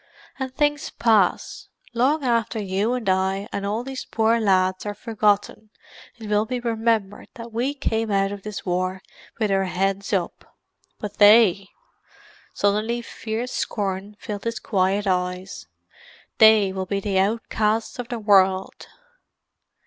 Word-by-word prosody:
"And 265 -1 -3
things 290 +1 0
pass. 215 -6 +1 0.3
Long 275 +6 +1
after 230 -3 0
you 200 +3 -1
and 245 -4 -5
I 190 +2 0
and 200 0 -3
all 215 +4 -2
these 265 0 -6
poor 225 +1 +1
lads 185 -3 +2
are 205 -1 -4
forgotten 210 0 0 0.5
it 225 -2 -9
will 210 +1 +1
be 250 +1 -2
remembered 225 -3 -1
that 235 -2 -9
we 255 +5 -1
came 225 -5 -1
out 195 -1 +1
of 205 -1 -7
this 210 0 -7
war 185 +1 -2 0.3
with 215 -3 0
our 195 0 +2
heads 195 +2 -2
up. 185 -4 -3 0.4
But 205 -1 -7
they——!" 205 -2 +6 0.8
Suddenly 215 +4 0
fierce 230 +2 -5
scorn 200 -1 -3
filled 210 -2 -6
his 230 0 -2
quiet 195 +1 0
eyes. 180 - -2 0.7
"They 220 -3 +6
will 190 -1 -4
be 200 0 -1
the 195 -1 0
outcasts 220 +2 -1
of 245 - -4
the 240 - -4
world!" 195 -3 +2
210 Hz, 140 wpm, -23 LUFS, 195-230 Hz, 0.8 s, they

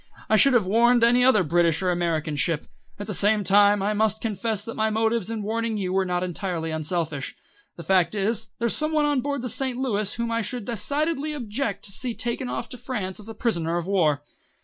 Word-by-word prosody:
"I 215 - +5
should 275 +5 +5
have 225 -5 +3
warned 235 +4 +4
any 245 +1 +5
other 250 -7 +5
British 170 +1 +2
or 180 - +2
American 165 -3 -1
ship. 150 +1 -1 0.3
At 205 - -6
the 210 - -4
same 205 +2 +2
time, 205 +1 +4
I 210 +1 +1
must 215 0 +1
confess 220 -1 -3
that 230 - -5
my 220 0 0
motives 220 -1 0
in 225 -2 -3
warning 225 +1 -2
you 185 -2 -2
were 190 0 +2
not 180 0 -1
entirely 175 -2 -3
unselfish. 160 -2 -2 0.4
The 170 - -9
fact 180 +2 +2
is, 220 +3 -1
there's 235 -1 +1
some 305 +1 +2
one 305 -1 +3
on 290 -3 +1
board 280 -1 -3
the - - -2
St. 255 +1 -1
Louis 215 -6 -1
whom 235 0 -2
I 230 0 0
should 240 0 -5
decidedly 290 - -2
object 240 -4 -3
to 200 - -6
see 240 +3 -4
taken 245 +2 -3
off 240 - -4
to 250 - -9
France 215 -7 -4
as 210 +1 -10
a 225 - -7
prisoner 170 -8 -1
of 170 - -3
war." 160 -7 +1
215 Hz, 220 wpm, -24 LUFS, 185-235 Hz, 0.4 s, I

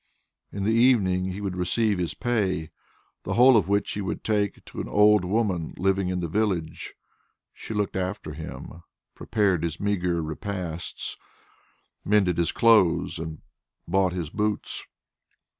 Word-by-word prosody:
In 100 - -4
the 110 +3 +2
evening 110 -7 +3
he 95 +2 -4
would 95 -3 -3
receive 95 +3 +1
his 85 -2 -2
pay, 95 -9 -1 0.5
the - - -3
whole 125 +2 +7
of 100 -6 +3
which 100 +1 +1
he 105 - -3
would 95 - -4
take 105 -2 -1
to - - -6
an - - -6
old 105 -1 +5
woman 95 -4 -1
living 95 0 +1
in 90 -1 -2
the 85 - -2
village. 90 -3 -2 0.6
She 110 - -7
looked 105 -2 -1
after 95 -4 -3
him, 80 +2 -8 0.3
prepared 100 -6 0
his 85 -1 -3
meagre 90 -5 0
repasts, 85 +1 -4 0.9
mended 95 -4 +2
his 85 - +1
clothes, 90 -8 +3
and 80 -1 -7 0.4
bought 95 +1 +2
his 85 -5 -4
boots. 105 -1 -2
95 Hz, 145 wpm, -25 LUFS, 85-105 Hz, 0.9 s, whole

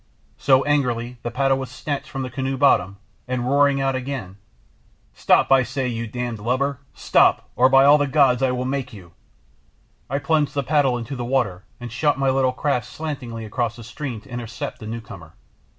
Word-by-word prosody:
So, 135 -1 +4
angrily 125 -4 -1
the 120 - -3
paddle 135 +2 +1
was 130 -2 -5
snatched 140 +2 -5
from 135 - -4
the 130 - -6
canoe 135 +1 -2
bottom, 100 -7 +3 0.3
and 125 -1 -2
roaring 140 0 +3
out 135 0 +1
again 130 -8 -5 0.8
"Stop, - - +3
I 135 0 +7
say, 130 +2 -2
you 115 -1 -3
d 125 +2 -4
lubber, 130 +6 -1 0.2
stop, - - +2
or 130 +1 +5
by 135 0 +6
all 145 +1 +7
the 145 - +1
gods 135 -3 +3
I 135 - +3
will 125 0 -2
make 135 -2 -3
you!" 90 -5 -12 1.0
I 140 - 0
plunged 145 +1 0
the 140 - 0
paddle 135 -3 +2
into 120 +4 -6
the 120 - -4
water 120 -8 -1
and 120 -1 -7
shot 145 +3 +1
my 135 -1 +2
little 130 -1 +2
craft 125 -2 -1
slantingly 125 -6 -6
across 115 +1 -2
the 120 - -11
stream 125 -1 -6
to 135 - -19
intercept 120 -1 -6
the 110 - -8
newcomer. 105 -8 -9
130 Hz, 190 wpm, -22 LUFS, 120-140 Hz, 1.0 s, I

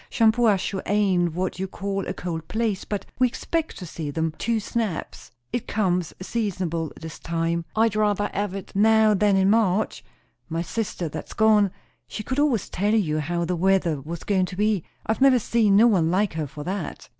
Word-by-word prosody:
"Shampuashuh 220 -4 +2
ain't 190 -5 +2
what 185 0 -2
you 190 - -2
call 195 +1 -3
a 185 - -2
cold 165 -3 -5
place; 220 -3 -1
but 205 -2 -4
we 255 - +5
expect 320 +6 -3
to 180 - -7
see 155 -2 -5
them 160 +2 -1
two 230 -1 0
snaps. 215 -4 -4 0.2
It 240 - -2
comes 180 -5 0
seasonable 185 -6 -2
this 160 -1 -8
time. 165 0 -1
I'd 220 -1 +2
rayther 205 -1 +1
hev 200 -1 -2
it 195 - -7
now 220 +1 +5
than 205 0 +3
in 190 +1 +4
March. 215 -2 +1 0.5
My 165 +1 -2
sister 175 0 -3
that's 150 - -7
gone, 215 -2 +4 0.4
she 215 - -6
could 260 +6 -2
always 275 -9 +2
tell 205 +4 0
you 155 -8 +1
how 170 +3 -1
the 180 +2 -1
weather 175 -4 +2
was 165 +4 -7
goin' 190 -3 +1
to 180 - -8
be. 210 -3 +1 0.2
I've 220 +4 -1
never 270 -2 +6
seen 220 -3 +2
no 215 +4 +7
one 185 -9 +3
like 190 +3 +1
her 155 -2 -3
for 145 +2 -8
that." 190 +5 -5
195 Hz, 190 wpm, -24 LUFS, 170-220 Hz, 0.5 s, no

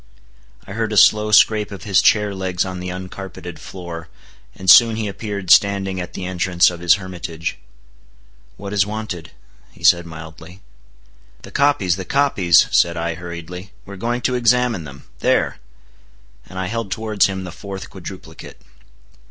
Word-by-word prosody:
I - - -11
heard 110 0 -2
a 105 - -1
slow 105 +1 +5
scrape 105 +1 +4
of 100 - -9
his 100 -4 +3
chair 105 -2 +3
legs 95 -2 -2
on 90 -1 -6
the 90 0 -5
uncarpeted 95 -2 -8
floor, 85 -3 -8 0.5
and 95 - -10
soon 115 +3 +8
he 110 -1 -3
appeared 100 -2 -4
standing 95 -2 +3
at 90 - -8
the 90 - -5
entrance 90 -1 +2
of 85 - -8
his 85 -1 +4
hermitage. 85 -4 -6 1.0
"What 100 0 -7
is 100 -2 +3
wanted?" 105 -6 -6 0.5
said 85 -1 +5
he - - -11
mildly. 80 +3 -11 0.8
"The - - -11
copies, 140 -12 +2
the 95 - -6
copies," 100 - +3
said 85 0 +3
I 85 0 -2
hurriedly. 90 +2 -9
"We 100 - -10
are - - -7
going 120 +5 -2
to 125 - 0
examine 120 -6 +2
them. 70 -1 -11 0.2
There"—and - - -5
I 95 - -2
held 115 +1 -4
towards 110 0 +1
him 95 -1 -5
the 90 - -7
fourth 95 +1 -8
quadruplicate. 90 -3 -10
95 Hz, 160 wpm, -20 LUFS, 85-105 Hz, 1.0 s, soon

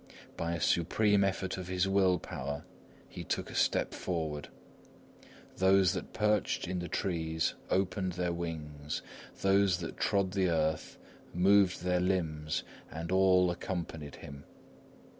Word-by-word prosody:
By 85 0 -2
a - - -4
supreme 100 +6 +3
effort 95 -1 -1
of 90 -1 -6
his 90 +1 +1
will 95 -2 +3
power, 70 -2 -5 0.4
he - - -8
took - - -3
a - - -9
step - - +1
forward; 80 -4 -3 1.1
those 95 -1 +4
that - - -5
perched 105 -5 +1
in 90 0 -2
the 90 - -4
trees 80 -5 -1 0.2
opened 95 -1 0
their 90 0 -1
wings, 75 -3 -5 0.4
those 95 -1 +4
that 85 -2 -6
trod 100 -2 +1
the 95 -2 +1
earth 80 -1 0 0.4
moved 95 0 +4
their 90 0 +2
limbs, 80 -5 -1 0.3
and 85 +2 -5
all 95 -1 +4
accompanied 80 -5 -5
him. 70 0 -10
90 Hz, 135 wpm, -31 LUFS, 80-95 Hz, 1.1 s, those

